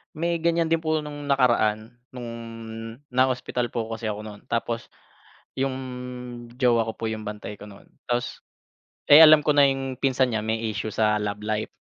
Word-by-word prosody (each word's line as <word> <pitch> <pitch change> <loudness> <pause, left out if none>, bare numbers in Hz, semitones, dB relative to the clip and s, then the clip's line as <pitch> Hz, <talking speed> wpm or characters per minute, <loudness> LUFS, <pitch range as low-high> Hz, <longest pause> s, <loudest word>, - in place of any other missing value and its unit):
May 170 +2 0
ganyan 170 0 +1
din 165 - +3
po 160 -1 -1
nung 145 -1 -7
nakaraan 115 -6 +2 0.2
nung 120 -2 -6 0.8
na-hospital 125 -1 0
po 115 -1 -2
kasi 115 0 -5
ako 105 -1 -3
nun, 105 -1 -10
tapos 115 0 -2 0.7
yung 135 0 0 0.8
jowa 120 -3 +2
ko 110 - -3
po 115 0 -3
yung 110 -1 -5
bantay 105 -1 -6
ko 105 - -10
no'n. 100 -1 -15 0.2
Tapos 120 0 -2 0.7
eh, 145 - +11
alam 155 -1 +9
ko 150 - +3
na 145 -1 +6
yung 135 -1 -3
pinsan 130 -2 +2
niya 110 - 0
may 110 +1 -2
issue 105 +1 -4
sa 105 0 +1
love 105 0 -4
life. 110 0 -1
120 Hz, 175 wpm, -25 LUFS, 110-140 Hz, 0.8 s, eh